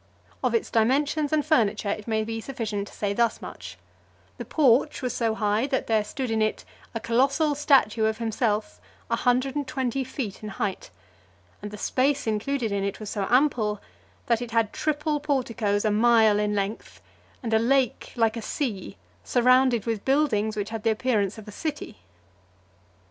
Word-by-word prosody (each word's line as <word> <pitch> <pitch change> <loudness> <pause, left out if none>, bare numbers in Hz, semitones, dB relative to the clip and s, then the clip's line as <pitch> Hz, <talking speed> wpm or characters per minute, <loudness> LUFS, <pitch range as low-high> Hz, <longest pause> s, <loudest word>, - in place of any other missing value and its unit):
Of - - +1
its 450 - -1
dimensions 285 +6 +1
and 305 -2 +1
furniture, 220 -9 +2
it 210 +1 -5
may 220 -1 0
be 225 +1 -4
sufficient 215 -6 -4
to - - -14
say 200 -1 -1
thus 235 +2 +1
much: - - -9 0.6
the - - -5
porch 280 -1 +2
was 250 -2 -1
so 225 -2 0
high 215 +3 +1
that 270 -2 -1
there 220 -2 +2
stood 250 +3 -4
in 220 0 +1
it 215 0 -1 0.3
a - - -1
colossal 275 +7 +2
statue 270 -7 +3
of 220 0 0
himself 220 -2 -1 0.3
a - - +4
hundred 255 +2 +1
and 290 -2 -2
twenty 265 -1 -1
feet 245 -5 -5
in 215 - -6
height; 195 -1 -4 0.7
and 210 - -6
the 210 - -9
space 270 +6 0
included 225 +2 -1
in 200 -1 -1
it 200 0 -3
was 215 -2 -6
so 200 -3 -2
ample, 245 -6 +2 0.5
that 235 -1 +1
it 240 - -5
had 225 -2 +1
triple 300 0 -1
porticos 230 -8 -1
a 215 - +3
mile 220 -1 +4
in 210 0 0
length, 200 +2 -4 0.4
and 225 -2 -2
a 220 - +5
lake 260 +1 +1
like 225 -2 +2
a 230 - -4
sea, 215 - -4 0.3
surrounded 250 - +3
with 225 -3 -2
buildings 240 -7 +1
which 205 +1 -3
had 225 -1 -4
the 225 - +1
appearance 215 -3 0
of 215 -1 -11
a - - -7
city. 300 +7 -5
230 Hz, 180 wpm, -25 LUFS, 215-265 Hz, 0.7 s, a